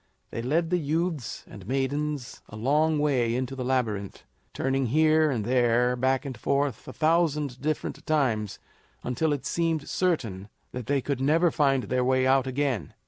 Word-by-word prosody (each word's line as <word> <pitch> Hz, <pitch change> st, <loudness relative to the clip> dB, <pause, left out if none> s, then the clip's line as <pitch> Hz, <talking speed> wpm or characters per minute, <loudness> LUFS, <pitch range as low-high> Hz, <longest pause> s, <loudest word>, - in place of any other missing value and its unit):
They 115 Hz, -, -4 dB
led 160 Hz, +7 st, 0 dB
the 180 Hz, -, +2 dB
youths 160 Hz, -2 st, -2 dB
and 100 Hz, -1 st, -11 dB
maidens 135 Hz, +1 st, -2 dB
a -, -, -10 dB
long 150 Hz, +7 st, +2 dB
way 130 Hz, -6 st, +1 dB
into 130 Hz, +1 st, -2 dB
the 130 Hz, -, -4 dB
Labyrinth, 115 Hz, -6 st, -2 dB, 0.3 s
turning 135 Hz, -1 st, 0 dB
here 155 Hz, +4 st, +4 dB
and 115 Hz, -7 st, -1 dB
there, 125 Hz, 0 st, +2 dB
back 130 Hz, +3 st, +1 dB
and 135 Hz, -2 st, -5 dB
forth, 140 Hz, -3 st, -1 dB
a -, -, -6 dB
thousand 155 Hz, -5 st, +1 dB
different 155 Hz, +2 st, -3 dB
times, 120 Hz, -10 st, 0 dB, 0.5 s
until 150 Hz, +5 st, 0 dB
it 145 Hz, -2 st, -2 dB
seemed 165 Hz, -3 st, -1 dB
certain 115 Hz, -, -1 dB, 0.2 s
that 125 Hz, -2 st, -6 dB
they 140 Hz, -1 st, +1 dB
could 135 Hz, -1 st, -2 dB
never 160 Hz, +5 st, +3 dB
find 135 Hz, -4 st, +2 dB
their 125 Hz, 0 st, 0 dB
way 130 Hz, 0 st, +2 dB
out 135 Hz, 0 st, +3 dB
again. 130 Hz, -, -2 dB
135 Hz, 165 wpm, -27 LUFS, 125-150 Hz, 0.5 s, here